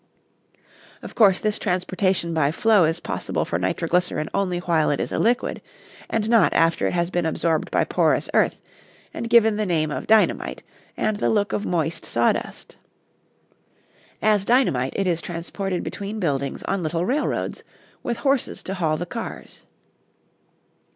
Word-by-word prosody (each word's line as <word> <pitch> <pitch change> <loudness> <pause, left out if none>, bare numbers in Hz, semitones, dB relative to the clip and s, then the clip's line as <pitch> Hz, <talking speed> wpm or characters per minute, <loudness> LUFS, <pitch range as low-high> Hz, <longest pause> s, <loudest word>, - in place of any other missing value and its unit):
Of - - -8
course 200 -5 +4
this 215 0 -1
transportation 185 -2 0
by 150 -3 +2
flow 210 +1 +4
is 160 +2 0
possible - - -3
for 85 - -2
nitroglycerin 165 - -1
only 185 -3 0
while 170 -3 +1
it 145 - 0
is - - -2
a - - -1
liquid, 240 +2 0 0.5
and 220 -1 -1
not 230 -1 +4
after 165 0 +3
it - - -2
has 175 0 0
been 175 -2 0
absorbed 160 0 0
by - - +2
porous - - +1
earth - - +2 0.5
and 230 - -5
given 225 -2 +5
the 215 - 0
name 155 -3 0
of - - -4
dynamite 220 -1 +2 0.3
and 215 -1 0
the - - 0
look 205 -2 +1
of 205 - -2
moist 165 -2 -1
sawdust. 120 0 -1 1.5
As 210 -2 +3
dynamite 195 - +2
it 195 - 0
is 170 -2 0
transported 180 +2 -4
between 205 +2 -5
buildings 140 -6 -2
on 195 -1 -1
little 165 +2 -1
railroads, 275 +8 -1 0.4
with 235 -1 -3
horses 275 -2 0
to 190 - -4
haul 160 -5 0
the 175 - -4
cars. 230 +6 -7
180 Hz, 155 wpm, -23 LUFS, 165-215 Hz, 1.5 s, given